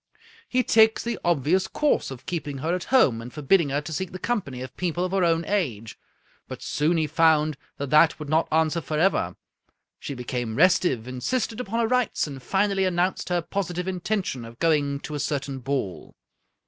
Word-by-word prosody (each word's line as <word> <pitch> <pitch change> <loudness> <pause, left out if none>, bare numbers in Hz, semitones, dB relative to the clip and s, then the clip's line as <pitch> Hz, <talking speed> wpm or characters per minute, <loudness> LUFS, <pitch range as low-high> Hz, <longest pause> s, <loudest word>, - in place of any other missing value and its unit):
He 255 0 +2
takes 220 -1 +4
the 235 -2 -3
obvious 175 +3 +2
course 300 -1 +1
of 130 -2 -9
keeping 155 -4 -4
her 160 +6 -1
at 180 -1 -2
home, 140 - +3
and 120 +2 -9
forbidding 150 +2 +2
her 145 +2 0
to 160 +2 -7
seek 190 +3 -3
the 185 - -6
company 175 - -3
of 130 - -9
people 175 0 -1
of 185 - -4
her 195 -1 +1
own 165 -1 +2
age. 125 - -2 0.5
But - - -8
soon 160 +4 +1
he 160 - +2
found 155 -1 +3 0.2
that 140 -1 -4
that 155 +1 +5
would 150 - -7
not 160 +3 +2
answer 160 +1 +2
forever. 155 - 0 0.6
She 140 - -6
became 120 -2 -4
restive, 170 -7 +3
insisted 220 - -2
upon 230 0 -2
her 230 - +2
rights, 250 -1 +1
and 140 -3 -8
finally 195 +5 +1
announced 180 +1 0
her 175 -1 0
positive 180 -1 -3
intention 185 - -2
of 115 +1 -11
going 145 -3 +1
to 150 - -7
a 145 - -3
certain 140 -2 -2
ball. 125 - -4
160 Hz, 185 wpm, -25 LUFS, 140-185 Hz, 0.6 s, that